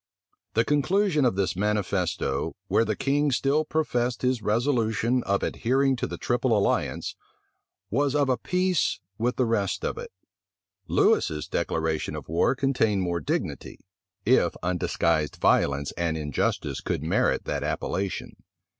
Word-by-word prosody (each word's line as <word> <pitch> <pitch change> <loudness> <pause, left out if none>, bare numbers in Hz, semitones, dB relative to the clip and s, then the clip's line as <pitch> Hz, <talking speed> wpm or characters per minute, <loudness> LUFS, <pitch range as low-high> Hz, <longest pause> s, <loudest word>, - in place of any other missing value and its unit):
The 115 +1 +3
conclusion 150 - +2
of 120 - +2
this 95 -2 0
manifesto, 100 -3 -1
where - - +3
the 110 - -1
king 145 +4 +1
still 140 +4 +2
professed 125 -7 -1
his 125 -2 +1
resolution 115 +1 +1
of 100 0 0
adhering 135 +3 +1
to - - -2
the - - -6
triple 120 -2 +1
alliance, 100 - 0 0.8
was 140 +4 +1
of 145 -2 +3
a 130 - +3
piece 180 +5 0 0.2
with 125 +3 0
the 130 - +2
rest 105 -4 0
of - - -2
it. - - -8 0.8
Lewis's 75 -1 +2
declaration 80 -1 -1
of - - -7
war 85 - +2
contained 120 -7 +1
more 85 -1 -1
dignity, 75 - -3 0.5
if - - +3
undisguised 85 -3 0
violence 70 +1 +2
and 85 -2 -1
injustice 75 -3 -1
could 70 - -2
merit 80 - +1
that - - -2
appellation. 95 +2 -3
115 Hz, 135 wpm, -26 LUFS, 90-135 Hz, 0.8 s, The